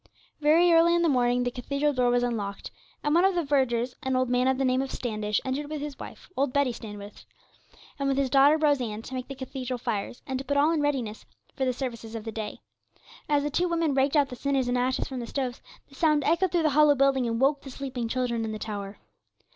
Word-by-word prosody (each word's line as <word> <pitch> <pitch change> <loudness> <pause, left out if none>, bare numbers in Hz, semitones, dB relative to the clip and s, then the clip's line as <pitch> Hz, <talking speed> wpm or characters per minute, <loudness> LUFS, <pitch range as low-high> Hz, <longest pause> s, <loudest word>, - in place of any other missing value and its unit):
Very 330 +3 +5
early 335 +1 +5
in 345 - +2
the - - +3
morning 245 0 +2
the 245 - -1
cathedral 280 +4 -1
door 250 -2 +2
was 245 0 +2
unlocked, 210 -5 -3 0.3
and 295 - +1
one 345 +2 +4
of 385 -1 +3
the 345 - +1
vergers, 260 -4 +1
an 265 -2 -1
old 255 -1 +1
man 250 +1 +2
of 265 0 +2
the 270 - 0
name 255 0 +2
of 270 - -3
Standish, 215 -3 -2
entered 280 +3 -3
with 305 -1 -4
his 290 -1 -6
wife, - - -10
old 275 -1 +1
Betty 280 -1 +2
Standish, 205 -2 -10 0.7
and 275 - 0
with 270 - 0
his 270 -2 0
daughter 280 +3 +6
Rose 295 -3 +2
Ann, 220 -2 -4
to 260 - -9
make 255 -1 -4
the 275 - -7
cathedral 260 -1 -5
fires, 235 -1 -4
and 265 +1 -4
put 285 - +1
all 295 +3 +4
in 320 -2 +1
readiness 255 -7 -2 0.3
for 265 - -1
the 255 - +2
services 235 -3 -6
of 225 - -5
the 225 - -5
day. 215 -1 -6 0.7
As 290 -1 +2
the 295 - -2
two 355 +5 +1
women 330 -3 +1
raked 270 +2 +2
out 285 -2 +3
the 250 - -7
cinders 270 -1 0
and 245 - 0
ashes 250 +1 0
from 260 -2 -5
the 235 - -5
stoves, 255 -2 -3 0.3
the - - -21
sound 300 0 +2
echoed 335 +5 +2
through 345 -2 +1
the 310 - +3
hollow 295 0 +5
building, 270 -2 +2
and 230 0 -1
woke 275 +2 +2
the 270 - -10
sleeping 260 -3 -4
children 235 -1 -1
in 220 - -3
the 215 - -4
tower. 205 -2 -6
265 Hz, 245 wpm, -27 LUFS, 245-290 Hz, 0.7 s, daughter